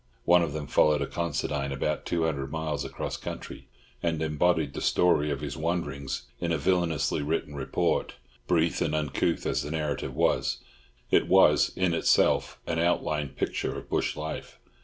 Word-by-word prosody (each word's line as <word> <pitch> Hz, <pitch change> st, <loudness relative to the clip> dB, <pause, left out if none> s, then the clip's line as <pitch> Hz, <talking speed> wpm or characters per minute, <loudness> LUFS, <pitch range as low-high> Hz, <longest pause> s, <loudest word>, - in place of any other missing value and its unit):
One 90 Hz, +1 st, +6 dB
of 85 Hz, -3 st, 0 dB
them 75 Hz, -1 st, -4 dB
followed 75 Hz, +2 st, +3 dB
a -, -, -1 dB
Considine 70 Hz, -3 st, -2 dB
about 70 Hz, -, -2 dB
two 85 Hz, -1 st, 0 dB
hundred 70 Hz, -4 st, -2 dB
miles 80 Hz, -3 st, -2 dB
across -, -, -4 dB
country, 65 Hz, -, -7 dB, 0.3 s
and 80 Hz, -2 st, 0 dB
embodied 80 Hz, -1 st, +1 dB
the -, -, -5 dB
story 80 Hz, -4 st, +3 dB
of 70 Hz, -1 st, -2 dB
his 75 Hz, -, -4 dB
wanderings 75 Hz, -6 st, -2 dB, 0.2 s
in 85 Hz, -1 st, -1 dB
a 80 Hz, -, +2 dB
villainously 80 Hz, -4 st, +1 dB
written 75 Hz, 0 st, -2 dB
report; 65 Hz, -2 st, -1 dB, 0.3 s
brief 85 Hz, -1 st, +2 dB
and 80 Hz, -2 st, +1 dB
uncouth 75 Hz, -3 st, 0 dB
as -, -, 0 dB
the 75 Hz, -, -5 dB
narrative 75 Hz, -3 st, -2 dB
was, -, -, +1 dB, 0.5 s
it -, -, +4 dB
was -, -, +5 dB
in 90 Hz, -2 st, +1 dB
itself -, -, +2 dB
an 80 Hz, -, -1 dB
outline 75 Hz, -4 st, +1 dB
picture 65 Hz, -, -3 dB
of -, -, -10 dB
bush -, -, 0 dB
life. 80 Hz, +1 st, -6 dB
75 Hz, 165 wpm, -28 LUFS, 70-85 Hz, 0.5 s, One